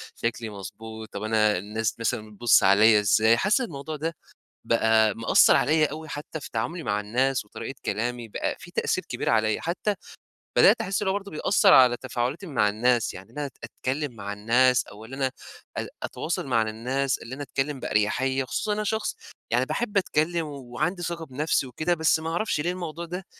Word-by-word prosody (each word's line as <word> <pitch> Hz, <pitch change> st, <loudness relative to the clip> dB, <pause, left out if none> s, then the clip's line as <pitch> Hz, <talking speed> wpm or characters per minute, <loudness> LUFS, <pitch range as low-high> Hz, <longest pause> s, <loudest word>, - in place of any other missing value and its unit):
شكلي 115 Hz, -1 st, -3 dB
مضبوط، 110 Hz, +2 st, -9 dB
طب 100 Hz, -, -5 dB
أنا 110 Hz, -1 st, +2 dB
الناس 105 Hz, +4 st, -3 dB
مثلًا 110 Hz, -1 st, -2 dB
بتبُصّ 115 Hz, +2 st, +4 dB
عليَّ 105 Hz, +3 st, +6 dB
إزاي؟ 110 Hz, +3 st, +4 dB
حاسس 205 Hz, -, +2 dB
الموضوع 155 Hz, -, -5 dB
ده 160 Hz, +2 st, -3 dB, 0.5 s
بقى 110 Hz, -2 st, +3 dB
مأثّر 115 Hz, 0 st, +5 dB
عليَّ 155 Hz, +1 st, +3 dB
أوي 155 Hz, +2 st, -8 dB
حتّى 150 Hz, +2 st, -6 dB
في -, -, -9 dB
تعاملي 120 Hz, +10 st, -2 dB
مع 105 Hz, -6 st, -1 dB
الناس 125 Hz, +4 st, 0 dB
وطريقة 125 Hz, +5 st, -8 dB
كلامي، 120 Hz, +1 st, -2 dB
بقى -, -, -2 dB
في -, -, -12 dB
تأثير -, -, -1 dB
كبير -, -, -2 dB
عليَّ، 110 Hz, -1 st, +2 dB
حتّى 185 Hz, +5 st, -1 dB, 0.6 s
بدأت -, -, +6 dB
أحس 195 Hz, +2 st, -1 dB
إن 205 Hz, -, -1 dB
هو 190 Hz, -, +2 dB
برضو 200 Hz, 0 st, -4 dB
بيأثّر 195 Hz, +5 st, +4 dB
على 125 Hz, -2 st, +7 dB
تفاعلاتي 130 Hz, +8 st, -3 dB
مع 120 Hz, -9 st, +2 dB
الناس، 120 Hz, +3 st, +1 dB
يعني 95 Hz, +4 st, -11 dB
إن 125 Hz, -, -14 dB
أنا 145 Hz, -, -2 dB
أت 130 Hz, -, -16 dB
أتكلّم 130 Hz, +4 st, -3 dB
مع 100 Hz, -1 st, -5 dB
الناس 120 Hz, +4 st, +3 dB
أو 105 Hz, +2 st, -11 dB
اللي 130 Hz, +4 st, -8 dB
أنا 135 Hz, -1 st, 0 dB, 0.5 s
أ -, -, -2 dB, 0.2 s
أتواصل 160 Hz, -3 st, -3 dB
م 130 Hz, -, -3 dB
على 110 Hz, -1 st, +3 dB
الناس، 130 Hz, +5 st, -1 dB
اللي 120 Hz, +3 st, -8 dB
أنا 145 Hz, -, -6 dB
أتكلّم 135 Hz, +1 st, -2 dB
بأرياحية، 130 Hz, +5 st, 0 dB
خصوصًا 210 Hz, -, -1 dB
أنا 215 Hz, +1 st, -1 dB
شخص 220 Hz, +1 st, -1 dB, 0.4 s
يعني -, -, +2 dB
باحب 220 Hz, -4 st, -2 dB
أتكلّم 170 Hz, -2 st, +1 dB
وعندي 145 Hz, +6 st, -3 dB
ثقة 170 Hz, -1 st, -4 dB
بنَفسي 145 Hz, 0 st, 0 dB
وكده، 155 Hz, +7 st, -1 dB
بس 160 Hz, -1 st, +2 dB
ما 160 Hz, 0 st, -4 dB
اعرفش 170 Hz, 0 st, -1 dB
ليه 175 Hz, +4 st, 0 dB
الموضوع 170 Hz, -2 st, -5 dB
ده 180 Hz, +2 st, -6 dB
130 Hz, 190 wpm, -26 LUFS, 110-160 Hz, 0.6 s, على